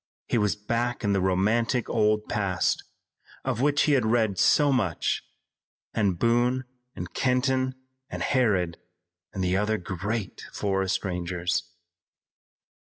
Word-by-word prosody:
He 120 - +1
was 105 -2 +1
back 115 +4 -2
in 100 -1 +2
the 100 - +2
romantic 110 +7 +1
old 105 -1 +1
past, 100 -4 0 0.6
of 115 - -1
which 145 0 +3
he 150 - +2
had 135 -4 +4
read 110 -3 +1
so 145 -1 +5
much, 105 - 0 0.7
with 100 -5 +1
Boone 120 +4 +2 0.3
and - - -7
Kenton 130 0 +1 0.3
and - - -4
Harrod 100 -10 +1 0.5
and 95 - -3
the 90 0 +1
other 105 +2 +1
great 100 +3 -4
forest 95 -1 -1
rangers. 90 -1 -2
105 Hz, 125 wpm, -26 LUFS, 95-120 Hz, 0.7 s, so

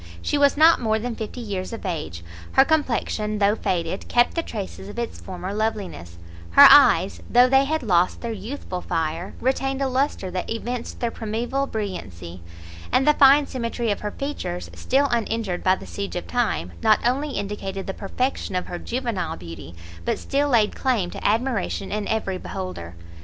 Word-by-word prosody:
She 85 - -1
was 285 0 +4
not 320 0 +6
more 220 -2 +1
than 235 +2 -3
fifty 220 +3 -6
years 195 -5 -4
of 225 -2 -7
age; 85 - -4 0.3
her 270 - +6
complection, 235 -8 0
though 205 0 +3
faded, 175 -2 -2
kept 240 0 +3
the 335 - 0
traces 200 - -7
of 205 - -10
its 235 -1 -4
former 185 +1 -6
loveliness, 205 - -3 0.4
her - - +10
eyes, 85 - +6
though 245 +1 +6
they 270 +1 +4
had 315 0 -1
lost 180 -4 +2
their 235 - -3
youthful 210 -3 -6
fire, 165 +3 -3
retained 270 +1 0
a 275 - +1
lustre 260 -7 -1
that 180 0 -4
evinced 235 +1 -4
their 235 -1 0
primeval 235 +6 -2
brilliancy, 95 - -6 0.5
and 270 - +2
the 300 - +7
fine 280 +1 +6
symmetry 235 -3 -2
of 205 - -2
her 210 - -3
features, 205 -9 -5
still 275 +2 +1
uninjured 225 -5 -1
by 185 0 +4
the - - -11
siege 200 0 -5
of 175 - -3
time, 215 - -1
not 215 -1 +4
only 275 +4 0
indicated 195 -2 -4
the 195 - -4
perfection 230 0 -3
of 180 - -1
her 175 - -6
juvenile 235 - -3
beauty, 85 -1 -10 0.3
but - - 0
still 285 +1 0
laid 225 -5 +3
claim 225 -9 0
to - - -8
admiration 220 -3 -1
in 210 0 -2
every 195 -4 -1
beholder. 185 - -6
215 Hz, 180 wpm, -23 LUFS, 185-255 Hz, 0.5 s, her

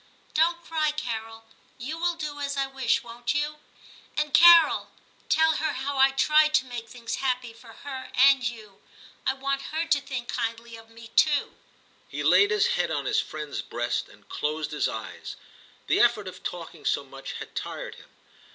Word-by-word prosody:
Don't 340 +2 +2
cry, 310 -2 0
Carol; 225 -6 -5 0.3
you 265 +5 -5
will 345 +1 0
do 300 -3 -5
as 280 0 -3
I 275 - +1
wish, 265 -1 0
won't 240 +3 -4
you? 300 +1 -1 0.6
And, 300 -1 -1
Carol, 340 -1 +7 0.4
tell 320 0 +4
her 315 - -1
how 275 +2 -3
I 270 0 +7
tried 305 +3 +4
to 305 - +3
make 240 -2 -7
things 235 0 -5
happy 250 -3 -2
for 230 0 -15
her 265 -2 -6
and 270 0 +6
you; 215 -4 -6 0.5
I 265 - +2
want 275 0 -2
her 320 +2 -1
to 290 -4 +2
think 265 -3 -5
kindly 230 -1 -4
of 225 0 -14
me 230 0 -13
too.' 295 -2 +3 0.6
He - - -4
laid 405 - +5
his 435 0 +3
head - - 0
on - - -2
his - - +2
friend's 150 -2 -5
breast - - -3
and - - -20
closed 150 +1 -3
his - - 0
eyes; - - -7 0.5
the - - +2
effort 235 -4 +3
of 185 - -9
talking 165 -3 -7
so - - +1
much 135 0 -9
had - - -9
tired - - -5
him. - - -16
265 Hz, 180 wpm, -26 LUFS, 230-300 Hz, 0.6 s, Carol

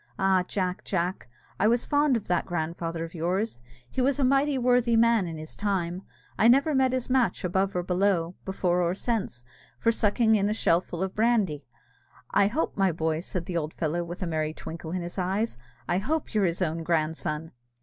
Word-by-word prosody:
Ah, 190 -1 +3
Jack, 185 -2 -2
Jack, 180 -7 -2 0.3
I 210 - +4
was 240 +2 +2
fond 290 -3 +3
of 210 - -7
that 175 -1 0
grandfather 165 0 -3
of 165 - -7
yours; 180 - -2 0.3
he 255 - -2
was 270 +2 +2
a 280 - +1
mighty 275 +2 +3
worthy 245 -2 +3
man 230 -4 +4
in 165 -1 -6
his 155 0 -8
time: 185 -3 -1 0.4
I 220 - +6
never 275 +6 +5
met 265 -1 +3
his 255 -1 -2
match 250 -7 +1
above 190 +2 0
or 180 - 0
below, 180 -2 +1
before 180 -2 0
or 175 +1 +1
since, 195 - -2 0.3
for 230 - +2
sucking 220 +1 +2
in 205 -1 +2
a 215 - 0
shellful 175 -2 +1
of 190 0 -3
brandy. 210 - +1 0.6
I 200 0 +4
hope, 275 +10 -1
my 195 -2 +2
boy," 160 -1 -1
said 175 0 -4
the 175 -1 -3
old 155 -1 -3
fellow, 170 +2 -1
with 175 +2 -6
a - - -1
merry 155 -2 -1
twinkle 165 0 -7
in 180 0 -2
his 175 +3 -6
eyes, 195 +5 -1 0.3
"I 175 +1 +1
hope 305 +9 -2
you're 210 -3 +3
his 175 +1 0
own 165 -1 -2
grandson!" 160 -1 -1
185 Hz, 200 wpm, -27 LUFS, 170-225 Hz, 0.6 s, I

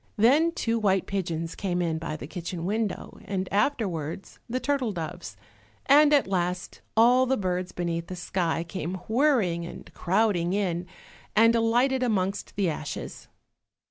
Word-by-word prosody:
Then 280 +10 +5
two 230 -7 0
white 195 -3 +2
pigeons 165 -4 -3
came 180 -3 -2
in 165 -2 0
by 155 -1 -4
the - - -7
kitchen 170 +1 -5
window, 210 +1 -2
and 190 -1 -2
afterwards 195 - -1
the 255 +2 -1
turtle 275 -5 0
doves, 160 - -6 0.5
and 290 +2 +6
at 290 -2 +5
last 180 -1 -2 0.2
all 250 +3 +6
the 265 +1 +2
birds 180 -1 -2
beneath 170 -1 -3
the 185 - -6
sky, 170 -1 -1
came 170 +1 -4
whirring 220 - +2
and 170 - -9
crowding 185 -2 +1
in, 180 -3 -1 0.5
and 230 +2 +6
alighted 240 +3 +2
amongst 200 -5 -1
the 200 -2 +1
ashes. 150 -3 -5
190 Hz, 145 wpm, -27 LUFS, 170-230 Hz, 0.5 s, and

